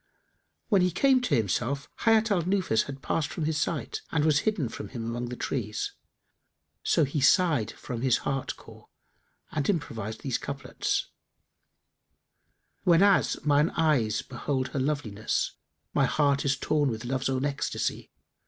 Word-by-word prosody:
When 200 Hz, -4 st, +4 dB
he 180 Hz, -, +3 dB
came 260 Hz, -, +3 dB
to 175 Hz, -12 st, +1 dB
himself 120 Hz, +5 st, -1 dB, 0.2 s
Hayat 225 Hz, 0 st, +4 dB
al 185 Hz, -4 st, +3 dB
Nufus 185 Hz, -, +1 dB
had 135 Hz, -1 st, -8 dB
passed 160 Hz, -, 0 dB
from 160 Hz, -, -3 dB
his 155 Hz, 0 st, 0 dB
sight 165 Hz, -3 st, -2 dB
and 155 Hz, -2 st, +2 dB
was 150 Hz, -2 st, +4 dB
hidden 185 Hz, -, -2 dB
from -, -, -7 dB
him 120 Hz, -3 st, -6 dB
among 120 Hz, +1 st, -3 dB
the 125 Hz, -, -5 dB
trees; 105 Hz, -5 st, -3 dB, 0.9 s
so 160 Hz, -, +3 dB
he 140 Hz, +1 st, -1 dB
sighed 145 Hz, -, +4 dB
from 120 Hz, -4 st, -6 dB
his 130 Hz, -2 st, +3 dB
heart 135 Hz, -1 st, -2 dB
core -, -, -15 dB, 0.6 s
and 145 Hz, -2 st, -1 dB
improvised 110 Hz, -, -2 dB
these 135 Hz, -4 st, -1 dB
couplets, 140 Hz, 0 st, -3 dB, 1.7 s
"Whenas 185 Hz, +1 st, +4 dB
mine 150 Hz, +2 st, +4 dB
eyes 135 Hz, -10 st, +2 dB
behold 130 Hz, 0 st, -2 dB
her 135 Hz, -, -3 dB
loveliness, 130 Hz, -7 st, -1 dB, 0.2 s
* -, -, -51 dB
My -, -, +3 dB
heart 140 Hz, -2 st, +2 dB
is 135 Hz, -1 st, +2 dB
torn 145 Hz, 0 st, +1 dB
with 110 Hz, 0 st, -4 dB
love's 130 Hz, +2 st, -1 dB
own 130 Hz, +1 st, 0 dB
ecstasy. 140 Hz, -1 st, -2 dB
140 Hz, 155 wpm, -28 LUFS, 125-160 Hz, 1.7 s, When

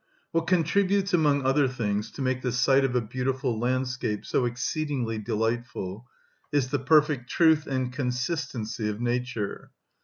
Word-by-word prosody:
What 165 Hz, 0 st, 0 dB
contributes 190 Hz, +3 st, +2 dB
among 145 Hz, -5 st, +3 dB
other 135 Hz, +1 st, +3 dB
things 110 Hz, -4 st, -2 dB
to 140 Hz, -, -4 dB
make 130 Hz, 0 st, 0 dB
the 125 Hz, -, -1 dB
sight 135 Hz, +3 st, +3 dB
of 130 Hz, -2 st, 0 dB
a 125 Hz, -, +3 dB
beautiful 125 Hz, +1 st, -2 dB
landscape 125 Hz, -3 st, -1 dB
so 125 Hz, -, +1 dB
exceedingly 120 Hz, -1 st, -2 dB
delightful 115 Hz, -1 st, -3 dB, 0.4 s
is 140 Hz, -4 st, +1 dB
the 145 Hz, -, +1 dB
perfect 145 Hz, -2 st, +3 dB
truth 160 Hz, -2 st, +4 dB
and 130 Hz, -2 st, -2 dB
consistency 125 Hz, -4 st, -2 dB
of 105 Hz, 0 st, -4 dB
nature. 120 Hz, -3 st, -2 dB
130 Hz, 145 wpm, -27 LUFS, 120-145 Hz, 0.4 s, truth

